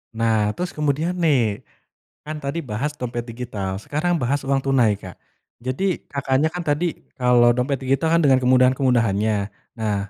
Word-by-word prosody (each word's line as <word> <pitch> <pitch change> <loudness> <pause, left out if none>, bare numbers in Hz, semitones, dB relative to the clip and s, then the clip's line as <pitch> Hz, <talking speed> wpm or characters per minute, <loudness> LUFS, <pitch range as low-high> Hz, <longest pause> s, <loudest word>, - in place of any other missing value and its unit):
Nah, 110 -2 +1
terus 180 0 -3
kemudian 150 +3 0
nih, 125 -11 +1 0.6
kan 155 +1 -5
tadi 140 +4 -2
bahas 125 +4 -3
dompet 120 -1 -4
digital, 110 -5 -4
sekarang 175 +4 0
bahas 135 +4 +1
uang 135 0 +2
tunai, 125 -6 +3
Kak. 95 -3 -10 0.5
Jadi 160 +9 -2
Kakaknya 140 +2 +1
kan 180 - -3
tadi 150 +2 0 0.3
kalau 125 -1 +5
dompet 130 +2 -1
digital 135 +5 +1
kan 170 - +4
dengan 135 -3 +5
kemudahan-kemudahannya. 125 -5 +3 0.4
Nah, 105 -2 0
130 Hz, 150 wpm, -22 LUFS, 115-145 Hz, 0.6 s, kalau